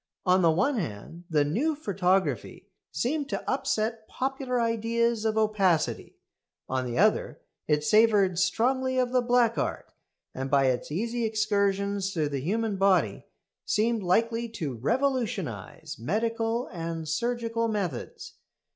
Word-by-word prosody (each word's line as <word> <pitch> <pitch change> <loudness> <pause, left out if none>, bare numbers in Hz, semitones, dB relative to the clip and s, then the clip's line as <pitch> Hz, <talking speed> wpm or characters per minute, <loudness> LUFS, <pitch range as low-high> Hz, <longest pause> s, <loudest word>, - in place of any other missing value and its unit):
On 185 0 +4
the 170 - +5
one 250 - +2
hand 160 - -6
the 150 -3 +2
"new 270 - 0
photography" 195 - -1 0.2
seemed 280 +3 -1
to - - -4
upset 225 -4 -1
popular 265 -1 -2
ideas 230 0 0
of 220 0 +1
opacity; 200 -7 +1 0.5
on 130 -1 -1
the 120 - -3
other 215 +4 +2 0.3
it 150 -1 +2
savoured 205 -2 +4
strongly 260 +7 +1
of 250 -1 +1
the 255 -1 +3
black 240 -1 +2
art, - - -3 0.4
and, 135 +1 -4
by 140 -1 +4
its 130 +2 0
easy 230 +8 -2
excursions 200 -2 0
through 155 -4 0
the 140 -2 -3
human 210 - -1
body, 195 -1 +2 0.4
seemed 225 +1 +1
likely 230 +5 +1
to 160 - -4
revolutionise 170 - -2
medical 225 - -1
and 165 -2 -5
surgical 230 +6 -1
methods. 195 - -4
215 Hz, 130 wpm, -27 LUFS, 170-235 Hz, 0.5 s, the